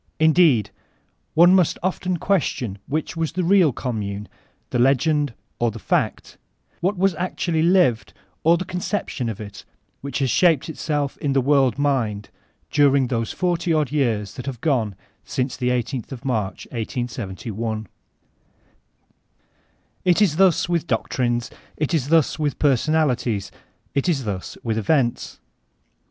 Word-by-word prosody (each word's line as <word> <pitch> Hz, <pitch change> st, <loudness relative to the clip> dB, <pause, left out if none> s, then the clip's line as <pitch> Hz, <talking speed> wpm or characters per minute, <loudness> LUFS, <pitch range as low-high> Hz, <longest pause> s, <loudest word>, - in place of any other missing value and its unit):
Indeed, 155 Hz, -, +4 dB, 0.6 s
one 175 Hz, +3 st, +7 dB
must 185 Hz, -4 st, +3 dB
often 185 Hz, -1 st, -1 dB
question 140 Hz, -, -1 dB
which 155 Hz, +2 st, -2 dB
was 165 Hz, -1 st, -2 dB
the 185 Hz, +1 st, -1 dB
real 180 Hz, -3 st, +5 dB
Commune, 105 Hz, -5 st, -4 dB, 0.4 s
the 125 Hz, -, 0 dB
l^end 140 Hz, +1 st, +2 dB, 0.2 s
or 120 Hz, -, +2 dB
the 110 Hz, -, -7 dB
fact,— 100 Hz, -, -2 dB, 0.4 s
what 190 Hz, +3 st, 0 dB
was 195 Hz, +1 st, +2 dB
actually 170 Hz, -1 st, -1 dB
lived, 170 Hz, -9 st, +3 dB, 0.3 s
or 170 Hz, +2 st, +5 dB
the 185 Hz, -, -4 dB
conception 180 Hz, -, -3 dB
of 110 Hz, -, -6 dB
it 100 Hz, -2 st, -9 dB, 0.4 s
which 140 Hz, 0 st, -4 dB
has 135 Hz, -4 st, +1 dB
shaped 165 Hz, -5 st, +3 dB
itself 145 Hz, -3 st, -2 dB
in 140 Hz, -2 st, 0 dB
the 135 Hz, -, +3 dB
world 135 Hz, -2 st, +3 dB
mind 120 Hz, -8 st, 0 dB, 0.4 s
during 140 Hz, -3 st, +4 dB
those 115 Hz, -3 st, -1 dB
forty 175 Hz, -1 st, -1 dB
odd 155 Hz, -3 st, +1 dB
years 115 Hz, -9 st, 0 dB
that 125 Hz, -, -8 dB
have 130 Hz, -4 st, -4 dB
gone 115 Hz, -, 0 dB, 0.3 s
since 130 Hz, 0 st, -2 dB
the 125 Hz, -1 st, -1 dB
i8th 125 Hz, 0 st, -2 dB
of 130 Hz, -2 st, -8 dB
March, 110 Hz, -7 st, -2 dB
1871. 115 Hz, -2 st, -4 dB, 2.2 s
It 180 Hz, -2 st, +3 dB
is 185 Hz, -8 st, +3 dB
thus 185 Hz, -4 st, +4 dB
with 170 Hz, -2 st, -1 dB
doctrines, 120 Hz, 0 st, -1 dB, 0.3 s
it 150 Hz, +2 st, -1 dB
is 145 Hz, -5 st, +1 dB
thus 160 Hz, 0 st, +2 dB
with 150 Hz, -3 st, -1 dB
personalities, 130 Hz, -7 st, +1 dB, 0.4 s
it 140 Hz, +5 st, +1 dB
is 140 Hz, -6 st, 0 dB
thus 100 Hz, -4 st, -5 dB
with 110 Hz, -2 st, -1 dB
events. 120 Hz, +2 st, 0 dB
135 Hz, 140 wpm, -22 LUFS, 115-165 Hz, 2.2 s, one